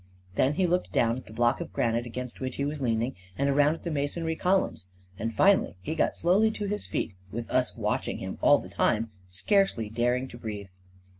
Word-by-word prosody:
Then 135 +8 +2
he 185 - +2
looked 180 +1 0
down 115 0 +2
at 130 - -9
the - - -11
block 120 +3 +2
of - - -6
granite 120 +1 0
against 125 +1 -6
which 130 -1 -3
he 140 - -1
was 145 0 -3
leaning, 115 0 0 0.2
and 140 +1 +2
around 145 +2 +4
at - - -14
the 170 - -3
masonry 160 +3 -1
columns, 180 - +1 0.3
and 115 +2 -1
finally 195 - +4
he 125 +12 -4
got 160 - +1
slowly 195 +6 +4
to 215 -1 -4
his 210 +1 -3
feet; - - -2 0.2
with 115 +2 -4
us 125 -1 +1
watch* - - -1
ing - - -2
him - - -6
all - - +7
the - - -7
time, 110 +1 +1 0.2
scarcely 115 - +1
daring 120 +3 +1
to 120 - -11
breathe. 105 -4 -6
130 Hz, 215 wpm, -28 LUFS, 115-165 Hz, 0.3 s, all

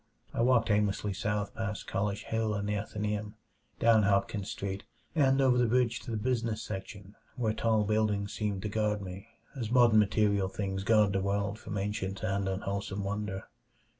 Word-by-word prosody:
I - - 0
walked 115 -2 +4
aimlessly 105 -1 +1
south 105 +1 -2
past 105 -2 -4
College 100 +1 -2
Hill 110 -1 -1
and 100 0 -2
the 105 - 0
Athenæum, 105 0 -3 0.4
down 115 -1 +5
Hopkins 100 0 +1
Street, 100 0 -4 0.3
and 135 -4 +3
over 130 -2 +4
the 120 - +4
bridge 120 0 +2
to - - -10
the 115 - -1
business 115 -1 -1
section 100 0 -7 0.2
where 115 -4 0
tall 110 -1 +2
buildings 105 -1 0
seemed 100 -3 -2
to - - -1
guard 105 -1 0
me 95 +3 -8 0.3
as 120 -5 -3
modern 120 -3 +6
material 100 -2 +2
things 95 -1 -3
guard 105 -1 +4
the 95 - +1
world 100 +2 -1
from 105 - -5
ancient 100 -1 -3
and 95 0 0
unwholesome 100 +1 -3
wonder. 100 -1 -3
105 Hz, 170 wpm, -30 LUFS, 100-110 Hz, 0.4 s, modern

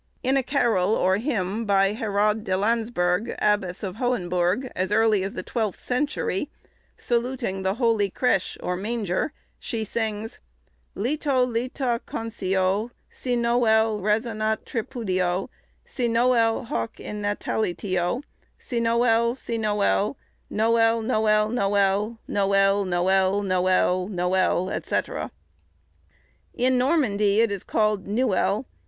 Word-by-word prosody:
In 265 +1 +2
a 270 - +3
carol, 225 -7 +1
or 185 +1 +2
hymn, 220 -3 -2
by 195 -1 +3
Herrade 210 0 0
de 185 -3 0
Landsberg, 220 -2 0
Abbess 205 -4 0
of 190 0 -4
Hohenbourg, 200 -1 0
as 185 +2 -1
early 215 -2 +3
as 195 - -4
the 185 - -4
twelfth 220 -3 -3
century, 265 -2 -1 0.5
saluting 240 -5 -1
the 190 +1 0
holy 225 -4 +2
"crêche," 195 -3 0
or 180 - -1
manger, 210 - -2 0.3
she 225 -3 -3
sings, 220 +1 -3 0.6
"Leto 265 +3 +1
leta 245 0 -2
concio 195 -1 -1 0.2
Cinoël 235 -3 +1
resonat 215 +1 0
tripudio, 195 -7 -2 0.4
Cinoël 235 -1 +1
hoc 115 - -4
in 210 0 -6
natalitio, 205 0 -1 0.4
Cinoël, 235 -1 +1
cinoël, 210 -1 0 0.4
Noël, 225 +1 +2
noël, 215 -2 +2
noël, 200 0 +1
Noël, 195 0 +2
noël, 190 +2 +2
noël, 185 -1 +2
noël, 185 0 0
&c." - - +1 1.5
In 255 +1 +2
Normandy 220 -8 +2
it 230 -2 +2
is 200 -2 -4
called 215 -2 0
nuel. 215 +1 +1
215 Hz, 110 wpm, -24 LUFS, 195-235 Hz, 1.5 s, a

